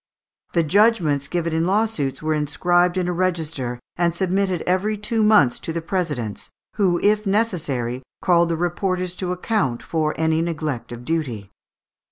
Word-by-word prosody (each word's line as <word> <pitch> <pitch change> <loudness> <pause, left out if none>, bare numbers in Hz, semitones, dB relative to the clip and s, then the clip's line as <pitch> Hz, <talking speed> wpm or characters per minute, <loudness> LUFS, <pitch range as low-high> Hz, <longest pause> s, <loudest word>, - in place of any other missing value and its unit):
The 170 - +3
judgments 165 -6 +3
given 170 -1 -2
in 165 +1 +1
lawsuits 195 -10 0
were 155 0 +1
inscribed 175 +4 +1
in 180 -1 0
a 180 - 0
register, 160 -9 -2 0.2
and 170 -1 +1
submitted 190 0 0
every 195 +4 0
two 220 +2 -1
months 210 - +4
to - - -4
the 170 - -2
presidents, 155 - -3 0.3
who, 180 -4 +2
if 210 0 +2
necessary, 155 - 0 0.2
called 170 -2 +3
the 165 - 0
reporters 180 +1 -1
to 180 -2 -2
account 180 - -1
for 155 -2 -1
any 160 0 +1
neglect 155 -8 -3
of 120 0 -8
duty. 125 - -3
170 Hz, 155 wpm, -22 LUFS, 150-185 Hz, 0.3 s, months